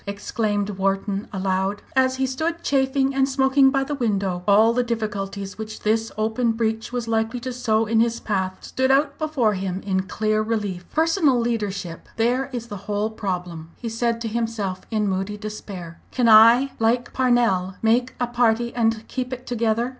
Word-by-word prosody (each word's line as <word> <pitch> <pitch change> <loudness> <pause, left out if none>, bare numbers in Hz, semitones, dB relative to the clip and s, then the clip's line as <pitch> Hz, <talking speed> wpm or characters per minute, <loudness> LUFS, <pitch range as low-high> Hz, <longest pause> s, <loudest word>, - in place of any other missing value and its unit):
exclaimed 205 0 -1
Wharton 195 +1 -1
aloud, 190 +1 -1
as 260 0 +3
he 265 0 0
stood 320 +6 -2
chafing 270 0 +1
and 270 0 +2
smoking 265 0 +4
by 270 0 +1
the 290 - -4
window. 200 -8 -1
All 215 +3 +5
the 250 - +2
difficulties 205 -4 -4
which 220 0 -7
this 220 +1 0
open 225 +2 +1
breach 225 0 -2
was 245 -2 -3
likely 225 +2 0
to 255 +1 -4
sow 225 -3 +1
in 225 +1 +1
his 235 0 +1
path 190 -3 -2
stood 260 0 -1
out 280 +1 +2
before 290 -9 +1
him 190 -1 -3
in 190 -1 -1
clear 215 +1 0
relief. 205 -5 -3
"Personal 320 -5 +2
leadership, 205 -7 -3
there 245 +4 +1
is 240 -3 -4
the 205 -3 -7
whole 210 +1 -1
problem," 180 -6 -4
he 235 - -5
said 230 +1 -1
to 230 - -2
himself 220 -4 -2
in 215 -2 0
moody 195 +2 -2
despair. 200 -5 -8
"Can 245 -2 +1
I 230 +5 +7
like 235 +2 +1
Parnell 235 -8 +2
make 245 +3 +2
a 245 - +1
party 240 -1 +1
and 225 -2 0
keep 255 -1 -4
it 255 0 -6
together? 235 0 0
225 Hz, 175 wpm, -23 LUFS, 205-250 Hz, -, I